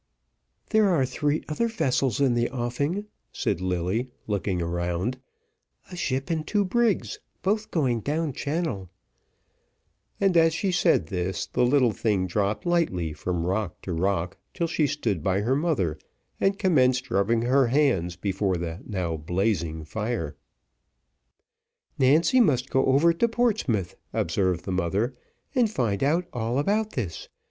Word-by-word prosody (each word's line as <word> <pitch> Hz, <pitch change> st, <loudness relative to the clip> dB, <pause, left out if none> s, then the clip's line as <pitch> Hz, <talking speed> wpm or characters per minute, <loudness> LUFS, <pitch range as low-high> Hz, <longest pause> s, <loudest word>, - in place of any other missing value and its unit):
"There 215 Hz, -2 st, +4 dB
are 160 Hz, -8 st, +3 dB
three 150 Hz, +3 st, -1 dB
other 155 Hz, +10 st, 0 dB
vessels 135 Hz, -, 0 dB
in 135 Hz, -3 st, +3 dB
the 120 Hz, 0 st, +1 dB
offing," 140 Hz, +10 st, -2 dB, 0.3 s
said 95 Hz, -3 st, -1 dB
Lilly, 95 Hz, +7 st, -1 dB, 0.2 s
looking 100 Hz, -3 st, -1 dB
round, 85 Hz, +7 st, -2 dB, 0.7 s
"a -, -, -6 dB
ship 135 Hz, -3 st, -2 dB
and 155 Hz, -2 st, -2 dB
two 205 Hz, -2 st, +1 dB
brigs, 230 Hz, +1 st, +1 dB, 0.2 s
both 215 Hz, +3 st, 0 dB
going 130 Hz, -8 st, +1 dB
down 150 Hz, +5 st, -1 dB
channel:" 140 Hz, -, -3 dB, 1.3 s
and 195 Hz, -3 st, +2 dB
as 165 Hz, -1 st, +5 dB
she 190 Hz, +3 st, 0 dB
said 175 Hz, -, +3 dB
this, 90 Hz, +2 st, -2 dB
the -, -, 0 dB
little 125 Hz, -1 st, +4 dB
thing 105 Hz, -4 st, 0 dB
dropped 100 Hz, +3 st, -1 dB
lightly 155 Hz, -, 0 dB
from 85 Hz, +2 st, -2 dB
rock 95 Hz, 0 st, -2 dB
to 90 Hz, -, -3 dB
rock 90 Hz, +1 st, -1 dB, 0.2 s
till 170 Hz, -, 0 dB
she 160 Hz, -2 st, +1 dB
stood 110 Hz, -, -1 dB
by 95 Hz, +4 st, +1 dB
her 125 Hz, +5 st, +1 dB
mother, 135 Hz, -, 0 dB, 0.4 s
and 195 Hz, 0 st, +2 dB
commenced 130 Hz, -9 st, +2 dB
rubbing 115 Hz, +4 st, +2 dB
her 130 Hz, +1 st, +3 dB
hands 115 Hz, -, +2 dB
before 95 Hz, 0 st, -1 dB
the 85 Hz, +2 st, -5 dB
now 90 Hz, -5 st, -2 dB
blazing 85 Hz, -1 st, -1 dB
fire. 105 Hz, -5 st, -3 dB, 1.6 s
"Nancy 155 Hz, -, +4 dB
must 135 Hz, -, +2 dB
go 135 Hz, -, +2 dB
over 145 Hz, +6 st, +4 dB
to 235 Hz, +8 st, +2 dB
Portsmouth," 215 Hz, -, 0 dB, 0.2 s
observed 90 Hz, +1 st, 0 dB
the 95 Hz, -, -3 dB
mother, 95 Hz, +7 st, 0 dB, 0.4 s
"and 245 Hz, -4 st, +3 dB
find 115 Hz, -, -1 dB
out 165 Hz, +6 st, +2 dB
all 120 Hz, +1 st, -1 dB
about 210 Hz, +8 st, 0 dB
this. 100 Hz, -10 st, -4 dB
120 Hz, 145 wpm, -26 LUFS, -, 1.6 s, as